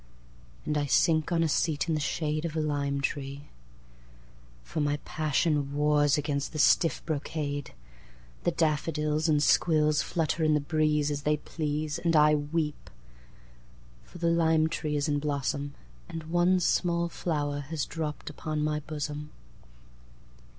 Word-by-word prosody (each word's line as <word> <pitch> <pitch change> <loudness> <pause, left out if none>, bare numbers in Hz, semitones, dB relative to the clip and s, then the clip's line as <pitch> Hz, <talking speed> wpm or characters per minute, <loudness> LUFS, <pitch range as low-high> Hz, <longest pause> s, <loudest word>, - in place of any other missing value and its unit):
And 150 -1 0
I 145 - -1
sink 155 +3 +3
on 165 -1 +2
a - - +2
seat 155 +1 0
in 165 - +1
the 155 - 0
shadeOf 155 +1 -2
a - - 0
lime 140 -2 -1
tree. 140 +1 -4 1.1
For 110 - -5
my 145 0 +1
passionWars 150 -1 +1
against 145 0 -2
the - - -4
stiff 155 +1 +3
brocade. 145 - -3 0.7
The - - +3
daffodils 155 0 0
and 150 -1 +3
squillsFlutter 155 +1 +2
in 155 -1 +4
the - - +3
breezeAs 150 -1 0
they 150 +1 +1
please. 150 0 -3
And 170 -1 +1
I 150 0 +6
weep; 150 0 -2 1.1
For - - -13
the 170 -1 +1
lime 160 -1 +3
tree 150 -1 -2
is 145 +1 0
in 145 -1 0
blossomAnd 145 +3 -4
one 175 +2 +3
small 170 -1 +1
flower 145 -4 -2
has 145 +1 -3
dropped 155 -2 -5
upon 155 -1 -3
my 150 0 0
bosom. 150 0 -5
150 Hz, 135 wpm, -28 LUFS, 145-160 Hz, 1.1 s, I